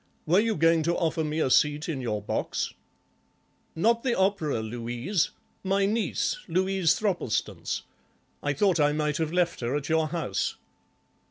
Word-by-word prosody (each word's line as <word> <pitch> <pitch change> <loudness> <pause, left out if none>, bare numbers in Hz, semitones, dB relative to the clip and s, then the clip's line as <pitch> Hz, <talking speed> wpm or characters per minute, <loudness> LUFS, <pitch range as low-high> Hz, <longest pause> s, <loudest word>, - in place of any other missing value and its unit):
Were 175 +5 +4
you 225 +1 +1
going 165 +1 +4
to 170 +2 +1
offer 160 -1 0
me 155 +1 -2
a 135 - +1
seat 150 +2 +3
in 150 -6 -3
your 105 -4 -2
box?" - - -2 1.0
"Not 230 +8 +2
the 250 -2 0
opera 190 - +1
'Louise'—my 120 - -2
niece, 220 - 0
Louise 190 -3 +2
Thropplestance. 175 - -1 0.6
I 145 - 0
thought 180 +3 +2
I 145 0 +4
might 150 -1 0
have 160 -1 -1
left 175 -1 +1
her 120 +3 -1
at 145 +1 -3
your 160 0 +2
house." 155 - -2
160 Hz, 150 wpm, -27 LUFS, 145-190 Hz, 1.0 s, Were